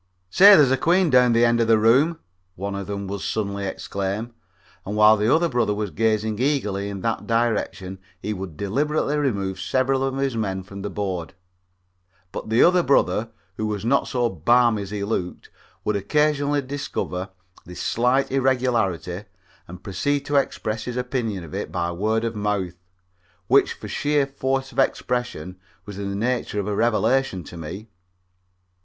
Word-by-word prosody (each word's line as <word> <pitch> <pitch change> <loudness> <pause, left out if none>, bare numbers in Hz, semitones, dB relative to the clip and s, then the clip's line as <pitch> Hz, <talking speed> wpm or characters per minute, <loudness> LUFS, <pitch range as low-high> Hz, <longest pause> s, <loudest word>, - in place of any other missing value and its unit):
"Say, 200 +2 +9
there's 145 -6 +5
a 130 - +3
queen 175 +3 +2
down 125 0 +6
at 120 - +2
the 115 +1 +4
end 115 0 +3
of 115 - +1
the 115 -1 +5
room," 130 +10 +4 0.4
one 100 +2 -4
of 100 -1 -5
them 100 -1 -4
would 100 0 -5
suddenly 100 -1 -2
exclaim, 100 +5 -4 0.5
and 105 - -5
while 105 +1 +7
the 110 +3 +1
other 170 +2 +4
brother 120 -7 0
was 105 -2 -3
gazing 110 -1 0
eagerly 105 -8 0
in 100 -2 -6
that 115 +2 -2
direction 110 -5 -1 0.2
he 105 - -3
would 95 -5 -7
deliberately 145 +8 0
remove 100 -10 -1
several 130 +10 +1
of 135 0 -1
his 135 -3 -1
men 95 -4 -2
from 100 +1 -9
the 105 - -4
board. 95 -4 -4 1.0
But 105 - -6
the 115 +2 +4
other 180 +1 +5
brother, 120 -6 +2 0.3
who 110 - -2
was 105 0 -3
not 140 +4 +2
so 120 -2 0
balmy 115 +4 +3
as 100 - -6
he 100 -1 -4
looked, 100 -4 -4 0.3
would 105 - 0
occasionally 145 +6 +1
discover 130 -9 -4 0.4
this 90 - -9
slight 125 +4 +1
irregularity 120 -9 0 0.4
and 90 +2 -11
proceed 140 +9 -1
to 145 - -2
express 115 -5 -1
his 125 0 -4
opinion 125 -7 -2
of 80 - -11
it - - -4
by 85 -1 -1
word 110 +6 0
of 115 -1 -2
mouth, 100 -4 -2 0.7
which - - +4
for - - -10
sheer 145 -1 +1
force 135 0 -2
of - - -5
expression 125 -8 -1 0.3
was 100 -1 -8
in 100 -1 -3
the 100 - -3
nature 115 -1 -1
of 100 - -2
a 105 - -1
revelation 115 -2 +1
to 85 - -11
me. 90 +7 -7
110 Hz, 175 wpm, -23 LUFS, 100-130 Hz, 1.0 s, Say